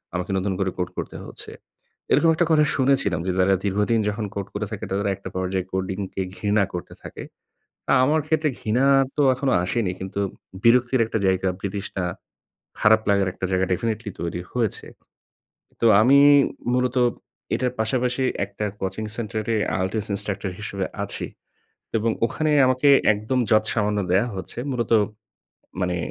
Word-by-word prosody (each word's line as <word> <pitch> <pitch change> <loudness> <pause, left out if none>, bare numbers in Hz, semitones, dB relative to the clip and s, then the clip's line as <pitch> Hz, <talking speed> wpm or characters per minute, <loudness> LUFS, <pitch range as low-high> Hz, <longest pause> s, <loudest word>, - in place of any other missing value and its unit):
আমাকে 90 +1 -3
নতুন 95 0 -1
করে 95 -1 +1
কোড 90 -1 -2
করতে - - -5
হচ্ছে। - - -9 0.6
এরকম 165 - +5
একটা 175 - +2
কথা 150 -1 +5
শুনেছিলাম 130 - +2
যে, - - +2
যারা 95 +1 +4
দীর্ঘদিন 105 +3 +1
যখন 105 +1 -3
কোড 100 -1 -3
করে 105 +1 -2
থাকে 105 - -5
তাদের 100 +1 0
একটা 95 -1 -9
পর্যায়ে 95 0 -1
কোডিংকে 95 +1 -3
ঘৃণা 105 -1 +1
করতে 90 - -6
থাকে। - - -8 0.7
আ - - +5
আমার 155 +2 +2
ক্ষেত্রে 155 -1 +1
ঘৃণা 120 +5 +1 0.3
তো - - +3
এখনো 130 0 0
আসেনি, 95 0 0
কিন্তু 95 +1 -5 0.4
বিরক্তির 125 +2 +4
একটা 110 - -2
জায়গা, 95 0 +1
বিতৃষ্ণা 100 -1 -4 0.8
খারাপ 110 0 +5
লাগার 100 -1 +3
একটা 95 - -4
জায়গা 95 0 +2
definitely 110 +2 -2
তৈরি 85 +1 -3
হয়েছে। 115 -5 -1 1.0
তো 115 - +3 0.2
আমি 135 +4 +6 0.6
মূলত 125 0 0 0.6
এটার 125 -1 0
পাশাপাশি 125 +3 0 0.2
একটা 100 +1 -5 0.2
কোচিং 95 +3 -3
সেন্টারে 110 0 -2 0.3
IELTS 105 +3 -2
instructor 100 -1 -2
হিসেবে 100 -2 -3 0.2
আছি। - - -4 0.7
এবং 115 +1 +1
ওখানে 155 +5 -1 0.2
আমাকে 130 +3 +3 0.2
একদম 110 +5 -2
যৎসামান্য 110 -1 +2
দেয়া 100 +7 +3
হচ্ছে। 95 +5 -6
মূলত 120 -2 -2 0.9
মানে 90 0 0
105 Hz, 145 wpm, -23 LUFS, 95-125 Hz, 1.0 s, আমি